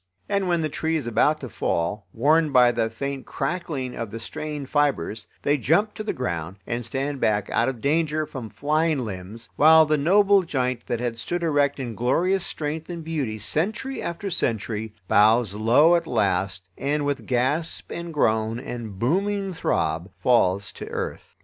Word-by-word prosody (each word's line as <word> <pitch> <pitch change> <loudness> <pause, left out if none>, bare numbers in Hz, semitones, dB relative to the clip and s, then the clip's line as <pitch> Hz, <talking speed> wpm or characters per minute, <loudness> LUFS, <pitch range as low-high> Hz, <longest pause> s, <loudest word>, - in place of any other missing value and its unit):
And 200 -2 0
when 170 -2 +1
the 155 - 0
tree 160 +2 -2
is 155 - -1
about 150 +6 +2
to 130 - -5
fall, 90 0 -2
warned 150 +7 +3
by 125 -2 +6
the 115 -1 0
faint 135 +4 -5
crackling 150 -8 -3
of 115 -2 -4
the 115 - -6
strained 145 +4 -5
fibers, 135 - 0 0.2
they 145 +1 +2
jump 190 - +2
to 215 - -6
the 215 - -1
ground, 85 -7 -4
and 120 0 -3
stand 135 +4 -3
back 105 -1 +1
out 120 +3 +2
of 125 -4 -6
danger 155 +1 +1
from 125 -6 -7
flying 155 +6 +1
limbs, 105 +3 -7
while 160 +1 +7
the 155 -1 +1
noble 200 +5 +5
giant 130 -7 -2
that 120 - -1
had 120 -1 -2
stood 175 +7 -3
erect 145 -3 +2
in 120 -3 -4
glorious 175 - +1
strength 155 +2 -4
and 170 -2 -5
beauty 145 -9 -2
century 210 - -2
after 180 +3 -4
century, 110 - -2
bows 110 +1 +4
low 120 +10 +5
at 170 -1 0
last 95 -4 0
and 145 +1 0
with 140 -6 -2
gasp 130 +6 0
and 170 0 -5
groan 110 -5 +1
and 120 -6 -6
booming 195 - 0
throb 85 - -1
falls 100 -2 +2
to - - -9
earth. - - -5
135 Hz, 175 wpm, -24 LUFS, 115-160 Hz, 0.2 s, while